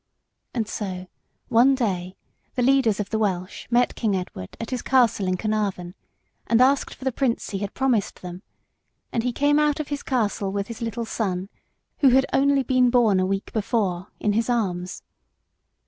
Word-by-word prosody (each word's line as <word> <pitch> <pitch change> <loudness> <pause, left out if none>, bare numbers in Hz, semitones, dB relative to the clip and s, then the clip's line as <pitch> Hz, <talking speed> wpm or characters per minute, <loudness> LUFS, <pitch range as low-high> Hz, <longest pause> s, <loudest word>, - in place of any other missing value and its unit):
And 225 -3 -1
so 185 -4 -4 0.4
one 250 +4 +5
day 185 -7 -2 0.4
the 250 - +1
leaders 255 -5 +3
of 205 -1 -3
the 220 - 0
Welsh 185 -3 -2
met 245 +1 +3
King 215 -4 0
Edward 180 - -6
at 230 - -5
his 255 - -2
castle 240 -7 +2
in 185 0 0
Caernarvon 200 -4 -2 0.5
and 230 - +3
asked 270 +2 +3
for 260 - -11
the 265 - +2
Prince 245 -1 -1
he 195 - -3
had 205 0 -5
promised 250 -9 0
them, 180 0 -7 0.7
and 230 - +1
he 250 +2 -1
came 290 +4 +2
out 300 -1 +2
of 305 - -4
his 285 -1 -3
castle 210 -6 -1
with 200 +1 -3
his 230 - -7
little 230 0 -3
son, 195 -4 -2 0.5
who 275 - +6
had 265 +2 +4
only 275 0 +3
been 255 -1 +3
born 230 -6 +4
a 185 - +1
week 195 +1 -3
before, 200 -4 -1
in 210 - +1
his 225 +3 0
arms. 185 -7 -2
225 Hz, 180 wpm, -24 LUFS, 195-255 Hz, 0.7 s, who